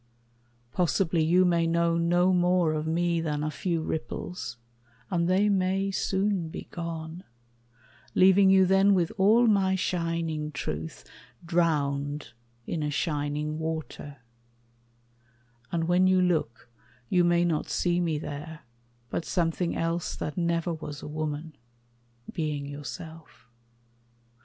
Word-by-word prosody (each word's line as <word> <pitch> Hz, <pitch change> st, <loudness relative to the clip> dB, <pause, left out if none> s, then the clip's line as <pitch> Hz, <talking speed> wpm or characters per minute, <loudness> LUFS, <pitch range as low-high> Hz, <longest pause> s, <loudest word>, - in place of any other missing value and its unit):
Possibly 175 Hz, 0 st, +1 dB
you 180 Hz, +4 st, +4 dB
may 170 Hz, -2 st, +2 dB
know 170 Hz, 0 st, +2 dB
no 175 Hz, +2 st, +3 dB
more 180 Hz, -2 st, +3 dB
of 155 Hz, 0 st, -2 dB
me 170 Hz, +1 st, +1 dB
Than 150 Hz, -2 st, -2 dB
a 155 Hz, -, -1 dB
few 165 Hz, 0 st, -2 dB
ripples; 160 Hz, +2 st, -5 dB, 0.5 s
and 170 Hz, -2 st, +1 dB
they 190 Hz, +3 st, +3 dB
may 195 Hz, 0 st, +1 dB
soon 190 Hz, -3 st, 0 dB
be -, -, -8 dB
gone, 165 Hz, 0 st, -6 dB, 0.9 s
Leaving 190 Hz, +1 st, +6 dB
you 190 Hz, 0 st, +6 dB
then 195 Hz, +2 st, +4 dB
with 175 Hz, -3 st, +1 dB
all 220 Hz, +5 st, +5 dB
my 195 Hz, -4 st, +3 dB
shining 165 Hz, -4 st, -2 dB
truth 80 Hz, -, -5 dB, 0.4 s
Drowned 145 Hz, -5 st, 0 dB, 0.3 s
in 165 Hz, -, -3 dB
a 150 Hz, -, -1 dB
shining 150 Hz, 0 st, -2 dB
water; 160 Hz, -3 st, -5 dB, 1.5 s
and 165 Hz, -1 st, 0 dB
when 180 Hz, +2 st, +3 dB
you 185 Hz, 0 st, +4 dB
look 155 Hz, -10 st, 0 dB, 0.4 s
You 180 Hz, -1 st, +3 dB
may 175 Hz, 0 st, +3 dB
not 165 Hz, -3 st, -1 dB
see 175 Hz, -1 st, +1 dB
me 165 Hz, -3 st, 0 dB
there, 150 Hz, +1 st, -7 dB, 0.5 s
but -, -, -2 dB
something 170 Hz, 0 st, -1 dB
else 165 Hz, 0 st, -1 dB
That 150 Hz, -, -4 dB
never 170 Hz, 0 st, 0 dB
was 150 Hz, -2 st, -7 dB
a -, -, -6 dB
woman 155 Hz, 0 st, -4 dB, 0.8 s
being 150 Hz, -3 st, -2 dB
yourself. 160 Hz, +3 st, -9 dB
170 Hz, 125 wpm, -27 LUFS, 155-180 Hz, 1.5 s, Leaving